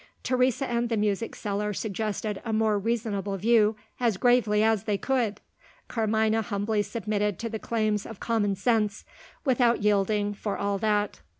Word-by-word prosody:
Teresa 255 +1 +1
and 235 0 0
the 230 - 0
music 210 +1 -1
seller 210 0 -2
suggested 210 0 -3
a 230 - -3
more 215 -1 +2
reasonable 205 -3 -2
view 220 +1 +3 0.2
as 235 -6 +1
gravely 220 -3 +3
as 220 -2 +2
they 210 -2 0
could. 240 -3 -1 0.5
Carmina 220 0 +1
humbly 210 0 -1
submitted 210 -2 -2
to 230 - -4
the 220 -1 -4
claims 215 -3 -1
of 225 - -9
common 210 -4 0
sense 210 0 0 0.4
without 245 -4 +3
yielding, 205 0 +2
for 205 0 -4
all 200 0 -1
that. 210 - 0
215 Hz, 155 wpm, -27 LUFS, 205-230 Hz, 0.5 s, view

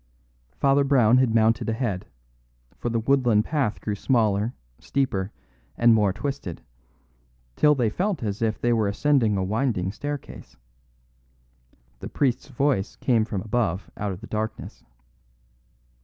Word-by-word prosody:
Father 140 +1 +4
Brown 125 -3 +4
had 120 -3 +2
mounted 115 0 +2
ahead; 110 -5 -2 0.7
for 120 - -3
the 115 0 0
woodland 120 -3 +2
path 140 -9 -1
grew 105 - -3
smaller, 110 0 +1 0.2
steeper, 105 -8 -1 0.5
and 120 0 +5
more 105 -3 +3
twisted, 135 - -5 0.9
till 150 0 +4
they 120 -5 +1
felt 185 - -1
as 105 -1 -3
if 110 -1 0
they 120 0 +2
were 110 -3 +1
ascending 110 0 +2
a 95 - 0
winding 105 -2 -1
staircase. 145 +5 -7 1.4
The - - -7
priest's 135 -1 0
voice 135 -6 0
came 115 -4 +1
from 105 -4 -3
above 105 -5 -1
out 105 -1 -3
of 90 - -7
the - - -8
darkness. 110 0 -5
115 Hz, 135 wpm, -25 LUFS, 105-135 Hz, 1.4 s, and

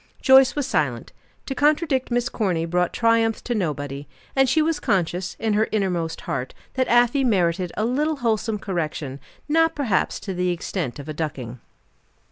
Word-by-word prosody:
Joyce 265 -1 +6
was 290 -2 -1
silent. - - -1 0.3
To 270 - -3
contradict 295 -2 +1
Miss 245 0 0
Corny 185 -10 -1
brought 180 +1 0
triumph 230 -1 +2
to 245 - -2
nobody. 145 - -3 0.3
And 270 -1 +4
she 290 - +3
was 315 0 +1
conscious, 180 0 -1
in 220 -1 0
her 215 +1 +2
innermost 180 -6 -1
heart, 130 -1 -4 0.2
that 260 -1 0
Afy 245 +3 +4
merited 180 -6 +1
a 215 - +1
little 295 +6 0
wholesome 225 -4 0
correction, 155 -8 -4 0.3
not 325 +2 +3
perhaps 240 -10 0
to 195 - -4
the 180 0 0
extent 175 -5 -3
of 145 0 -9
a 155 - -4
ducking. 135 -6 -5
210 Hz, 165 wpm, -23 LUFS, 170-260 Hz, 0.3 s, Joyce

